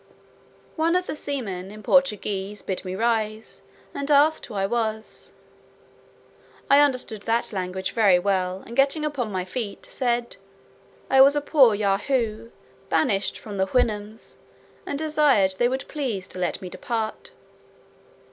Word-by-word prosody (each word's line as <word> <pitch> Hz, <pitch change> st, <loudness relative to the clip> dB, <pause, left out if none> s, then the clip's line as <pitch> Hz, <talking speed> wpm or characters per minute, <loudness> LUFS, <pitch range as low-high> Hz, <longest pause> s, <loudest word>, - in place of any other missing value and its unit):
One 330 Hz, +2 st, +2 dB
of 365 Hz, 0 st, +1 dB
the -, -, -4 dB
seamen, 215 Hz, -12 st, -4 dB
in 215 Hz, +1 st, -11 dB
Portuguese, 210 Hz, -6 st, +1 dB
bid 190 Hz, -, -3 dB
me 185 Hz, -1 st, -5 dB
rise, 220 Hz, 0 st, -2 dB, 0.3 s
and 280 Hz, +1 st, -4 dB
asked 295 Hz, +2 st, +4 dB
who 220 Hz, -, -9 dB
I 195 Hz, -1 st, 0 dB
was. 220 Hz, 0 st, -3 dB, 1.4 s
I 280 Hz, -, +8 dB
understood 255 Hz, -7 st, +1 dB
that 230 Hz, +1 st, 0 dB
language 190 Hz, 0 st, -3 dB
very 205 Hz, -6 st, +4 dB
well, 185 Hz, 0 st, -1 dB
and 235 Hz, -, -9 dB
getting 275 Hz, +3 st, +2 dB
upon 265 Hz, -7 st, -3 dB
my 185 Hz, -2 st, -2 dB
feet, 205 Hz, +1 st, -5 dB
said, 240 Hz, -1 st, -2 dB, 0.7 s
"I 265 Hz, 0 st, +5 dB
was 280 Hz, +2 st, +7 dB
a -, -, +3 dB
poor 275 Hz, -6 st, +4 dB
Yahoo 215 Hz, +2 st, -1 dB, 0.4 s
banished 195 Hz, +5 st, +1 dB
from 205 Hz, -2 st, -8 dB
the 190 Hz, 0 st, +1 dB
Houyhnhnms, 215 Hz, -2 st, -2 dB, 0.5 s
and 285 Hz, -, -2 dB
desired 295 Hz, -11 st, +3 dB
they 240 Hz, -, +4 dB
would 260 Hz, +1 st, -3 dB
please 240 Hz, -11 st, -3 dB
to 185 Hz, -, -9 dB
let 180 Hz, +1 st, -2 dB
me 180 Hz, -, -6 dB
depart." 220 Hz, +1 st, -4 dB
220 Hz, 145 wpm, -24 LUFS, 195-270 Hz, 1.4 s, I